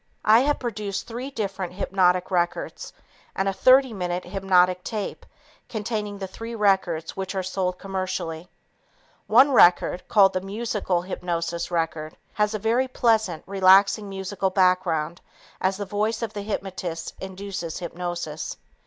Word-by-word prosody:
I 220 Hz, +2 st, +7 dB
have 290 Hz, +3 st, +2 dB
produced 210 Hz, -5 st, -4 dB
three 245 Hz, +3 st, -6 dB
different 195 Hz, -8 st, -4 dB
hypnotic 185 Hz, -1 st, +1 dB
records 180 Hz, -, -2 dB, 0.4 s
and 195 Hz, -, 0 dB
a 195 Hz, -, +1 dB
30 260 Hz, +3 st, +5 dB
minute 180 Hz, -2 st, -3 dB
hypnotic 180 Hz, -1 st, +2 dB
tape 215 Hz, -3 st, -5 dB, 0.4 s
containing 210 Hz, -2 st, -3 dB
the 195 Hz, -, -5 dB
three 225 Hz, +5 st, -7 dB
records 190 Hz, -6 st, +1 dB
which 190 Hz, 0 st, -4 dB
are 190 Hz, -, -1 dB
sold 185 Hz, -1 st, -2 dB
commercially. 185 Hz, -3 st, -4 dB, 0.8 s
One 280 Hz, +2 st, +6 dB
record, 180 Hz, -5 st, +5 dB
called 195 Hz, -3 st, +5 dB
the 185 Hz, -, -1 dB
Musical 195 Hz, -3 st, -2 dB
Hypnotic 170 Hz, -2 st, -3 dB
Record, 165 Hz, -2 st, -2 dB, 0.2 s
has 210 Hz, 0 st, 0 dB
a -, -, 0 dB
very 230 Hz, +5 st, +1 dB
pleasant, 220 Hz, -9 st, +1 dB
relaxing 195 Hz, +2 st, +4 dB
musical 195 Hz, 0 st, -2 dB
background 180 Hz, -3 st, +1 dB, 0.4 s
as 190 Hz, +1 st, +1 dB
the 205 Hz, -, -4 dB
voice 215 Hz, +4 st, -1 dB
of 220 Hz, -2 st, -4 dB
the 205 Hz, -, -4 dB
hypnotist 185 Hz, -5 st, -4 dB
induces 190 Hz, -3 st, -6 dB
hypnosis. 175 Hz, -3 st, -5 dB
190 Hz, 135 wpm, -24 LUFS, 180-210 Hz, 0.8 s, I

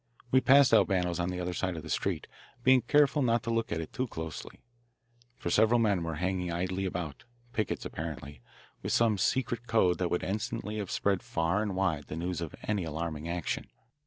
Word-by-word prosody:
We 130 Hz, -, +5 dB
passed 135 Hz, -2 st, +6 dB
Albano's 90 Hz, -5 st, +3 dB
on 85 Hz, +1 st, 0 dB
the 90 Hz, 0 st, -3 dB
other 90 Hz, 0 st, -2 dB
side 90 Hz, -1 st, -2 dB
of 80 Hz, -, -6 dB
the -, -, -8 dB
street, -, -, -1 dB, 0.4 s
being 130 Hz, 0 st, +6 dB
careful 145 Hz, +3 st, +3 dB
not 115 Hz, -3 st, +2 dB
to 115 Hz, -, -2 dB
look 115 Hz, 0 st, -1 dB
at 85 Hz, -, -1 dB
it 80 Hz, -, -8 dB
too 130 Hz, 0 st, -1 dB
closely, 80 Hz, -7 st, -7 dB, 0.8 s
for 85 Hz, -, -3 dB
several 110 Hz, +4 st, +4 dB
men 105 Hz, -5 st, +2 dB
were 80 Hz, -1 st, -3 dB
hanging 90 Hz, +1 st, -1 dB
idly 90 Hz, +3 st, -1 dB
about 85 Hz, -6 st, -4 dB, 0.3 s
pickets, 110 Hz, -, -2 dB
apparently, 75 Hz, -4 st, -6 dB, 0.4 s
with -, -, -2 dB
some 110 Hz, -4 st, +3 dB
secret 120 Hz, +1 st, 0 dB
code 95 Hz, -6 st, +3 dB
that 90 Hz, -1 st, 0 dB
would 90 Hz, -, -1 dB
instantly 105 Hz, +1 st, -3 dB
have 100 Hz, -3 st, -3 dB
spread 100 Hz, -2 st, +1 dB
far 85 Hz, +5 st, 0 dB
and 105 Hz, -3 st, -2 dB
wide 85 Hz, -7 st, 0 dB
the -, -, -5 dB
news 85 Hz, 0 st, -3 dB
of 85 Hz, -, -5 dB
any 105 Hz, -3 st, -1 dB
alarming 80 Hz, 0 st, -4 dB
action. 85 Hz, -1 st, -2 dB
90 Hz, 195 wpm, -30 LUFS, 85-110 Hz, 0.8 s, passed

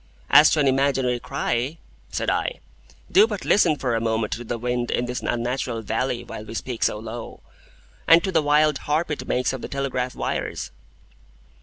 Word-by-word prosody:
"As 150 Hz, +1 st, +8 dB
to 155 Hz, -, +1 dB
an 140 Hz, -, +3 dB
imaginary 135 Hz, -2 st, +1 dB
cry," 125 Hz, +6 st, -2 dB, 0.3 s
said -, -, -3 dB
I, -, -, -1 dB, 0.5 s
"do 405 Hz, +4 st, +6 dB
but -, -, -5 dB
listen 175 Hz, -6 st, +4 dB
for 130 Hz, -4 st, -2 dB
a 115 Hz, -, 0 dB
moment 110 Hz, -1 st, 0 dB
to 120 Hz, -, -5 dB
the 120 Hz, 0 st, -4 dB
wind 120 Hz, +1 st, -2 dB
in 120 Hz, -, 0 dB
this 125 Hz, 0 st, -4 dB
unnatural 120 Hz, -1 st, -2 dB
valley 120 Hz, +3 st, -2 dB
while 105 Hz, -, -8 dB
we 110 Hz, -, -9 dB
speak 120 Hz, 0 st, -5 dB
so -, -, +2 dB
low, 115 Hz, +2 st, -8 dB, 0.7 s
and 165 Hz, +1 st, +7 dB
to 190 Hz, -, -1 dB
the 165 Hz, -3 st, +3 dB
wild 150 Hz, 0 st, +3 dB
harp 155 Hz, +2 st, +1 dB
it 150 Hz, -, -4 dB
makes 125 Hz, +1 st, 0 dB
of 130 Hz, -, -5 dB
the -, -, -5 dB
telegraph 130 Hz, -2 st, -2 dB
wires." -, -, -3 dB
125 Hz, 185 wpm, -23 LUFS, 120-150 Hz, 0.7 s, As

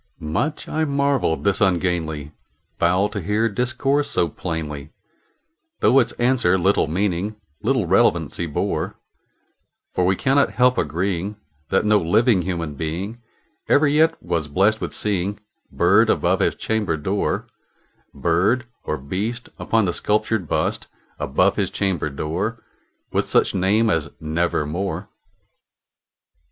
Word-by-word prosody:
Much 85 Hz, -, -2 dB
I 160 Hz, -, -1 dB
marvelled 140 Hz, -, +1 dB
this 100 Hz, 0 st, +2 dB
ungainly 85 Hz, -6 st, 0 dB, 0.5 s
fowl 90 Hz, +4 st, +3 dB
to 100 Hz, -, -4 dB
hear 105 Hz, +6 st, +1 dB
discourse 130 Hz, +5 st, 0 dB
so 85 Hz, -, +1 dB
plainly, 75 Hz, -3 st, -5 dB, 0.9 s
Though 135 Hz, -, +5 dB
its 120 Hz, -, +1 dB
answer 120 Hz, -7 st, +2 dB
little 95 Hz, -2 st, +2 dB
meaning 95 Hz, +4 st, -1 dB, 0.3 s
little 120 Hz, -2 st, +1 dB
relevancy 85 Hz, -4 st, +2 dB
bore; 75 Hz, -, -2 dB, 1.0 s
For 90 Hz, -, +1 dB
we 95 Hz, +1 st, +3 dB
cannot 135 Hz, -1 st, +2 dB
help 125 Hz, +3 st, +3 dB
agreeing 90 Hz, +5 st, -2 dB, 0.3 s
that 95 Hz, -, +2 dB
no 105 Hz, 0 st, +4 dB
living 105 Hz, +4 st, +3 dB
human 85 Hz, -4 st, -3 dB
being 90 Hz, +10 st, -4 dB, 0.5 s
Ever 145 Hz, +1 st, +5 dB
yet 160 Hz, +3 st, +3 dB
was 85 Hz, -3 st, -1 dB
blessed 100 Hz, +9 st, +2 dB
with -, -, -3 dB
seeing 100 Hz, -1 st, -2 dB, 0.3 s
bird -, -, +4 dB
above -, -, +2 dB
his -, -, +1 dB
chamber 110 Hz, -7 st, -1 dB
door 95 Hz, +7 st, -1 dB, 0.7 s
Bird 100 Hz, +9 st, +1 dB, 0.2 s
or 75 Hz, -, -2 dB
beast 100 Hz, -, -4 dB
upon 115 Hz, -2 st, +1 dB
the 90 Hz, -, 0 dB
sculptured 105 Hz, -2 st, 0 dB
bust -, -, -1 dB, 0.3 s
above 75 Hz, +8 st, +1 dB
his 100 Hz, -3 st, 0 dB
chamber 95 Hz, -7 st, -1 dB
door, 90 Hz, -, -3 dB, 0.5 s
With -, -, 0 dB
such -, -, +2 dB
name 105 Hz, +4 st, +2 dB
as 80 Hz, -4 st, 0 dB
"Nevermore." 85 Hz, +3 st, -2 dB
95 Hz, 125 wpm, -22 LUFS, 85-115 Hz, 1.0 s, Though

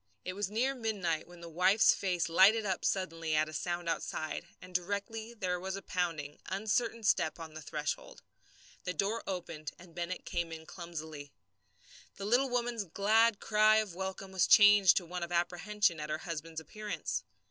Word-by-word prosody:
It 185 Hz, -, -3 dB
was 200 Hz, 0 st, -2 dB
near 245 Hz, +6 st, +1 dB
midnight 200 Hz, -11 st, -2 dB
when 175 Hz, 0 st, -14 dB
the 170 Hz, -, -8 dB
wife's 180 Hz, +6 st, +5 dB
face 180 Hz, -3 st, -1 dB
lighted 200 Hz, +6 st, +5 dB
up 190 Hz, -2 st, -1 dB
suddenly 165 Hz, -4 st, -1 dB
at 155 Hz, 0 st, +3 dB
a 155 Hz, -, -9 dB
sound 175 Hz, +2 st, -3 dB
outside, 155 Hz, -1 st, -3 dB
and 180 Hz, 0 st, -13 dB
directly 205 Hz, +5 st, -2 dB
there 180 Hz, -4 st, -1 dB
was 190 Hz, +1 st, -4 dB
a 195 Hz, -, -6 dB
pounding, 165 Hz, -5 st, -2 dB
uncertain 220 Hz, +4 st, -1 dB
step 165 Hz, -5 st, +2 dB
on 160 Hz, -1 st, -8 dB
the 155 Hz, -, -8 dB
threshold. 150 Hz, -1 st, -4 dB, 0.6 s
The 180 Hz, -, -3 dB
door 210 Hz, +4 st, 0 dB
opened 165 Hz, -5 st, -5 dB
and 175 Hz, -1 st, -15 dB
Bennett 175 Hz, +2 st, -4 dB
came 170 Hz, -1 st, -2 dB
in 160 Hz, 0 st, -8 dB
clumsily. 160 Hz, -5 st, -8 dB, 0.8 s
The 195 Hz, -, -6 dB
woman's 245 Hz, 0 st, +1 dB
little 185 Hz, -5 st, -9 dB
glad 220 Hz, +2 st, +4 dB
cry 215 Hz, 0 st, +4 dB
of 215 Hz, -4 st, +1 dB
welcome 190 Hz, +1 st, -5 dB
was 190 Hz, -2 st, +2 dB
changed 205 Hz, -3 st, +8 dB
to 180 Hz, -, 0 dB
one 180 Hz, +1 st, -5 dB
of 170 Hz, 0 st, -4 dB
apprehension 175 Hz, +2 st, +1 dB
at 150 Hz, 0 st, -5 dB
her 155 Hz, -, -1 dB
husband's 165 Hz, -1 st, -5 dB
appearance. 210 Hz, +7 st, -4 dB
180 Hz, 175 wpm, -32 LUFS, 165-210 Hz, 0.8 s, changed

